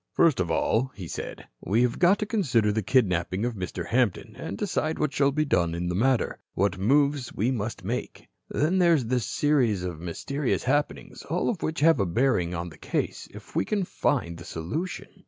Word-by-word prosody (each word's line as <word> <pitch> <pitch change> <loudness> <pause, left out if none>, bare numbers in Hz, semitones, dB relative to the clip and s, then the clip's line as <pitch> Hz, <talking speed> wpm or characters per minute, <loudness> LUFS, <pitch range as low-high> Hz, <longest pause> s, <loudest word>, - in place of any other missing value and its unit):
"First 165 - +4
of 90 -2 0
all," 115 +10 +1
he 90 -4 -7
said, - - -6 0.2
"we 110 +5 +2
have 120 -1 0
got 180 +3 +5
to 210 - -2
consider 125 - +2
the 110 +1 0
kidnapping 95 -3 +1
of 120 - -1
Mr. 90 -3 -5
Hampton 120 -5 0
and 100 - -6
decide 160 -5 -1
what 150 -2 0
shall 140 0 +3
be 155 +2 +1
done 85 - +1
in 90 +1 -2
the - - -1
matter, 120 +6 +1 0.2
what 95 -1 +1
moves 140 +4 +2
we 115 +6 +1
must 115 -2 -3
make. - - -4 0.2
Then 170 +6 +1
there 170 -2 +5
is 135 -6 0
this 125 -1 0
series 125 -11 +2
of 90 -4 -4
mysterious 125 - -2
happenings, 145 +3 -1
all 175 +4 0
of 195 - -6
which 155 -1 -2
have 165 -2 +5
a 100 - +1
bearing 90 -3 +1
on 85 +1 -4
the - - -15
case, - - -3
if - - -13
we - - +2
can 200 - -1
find 85 - -1
the - - -9
solution. 90 - -4
120 Hz, 205 wpm, -26 LUFS, 95-150 Hz, 0.2 s, got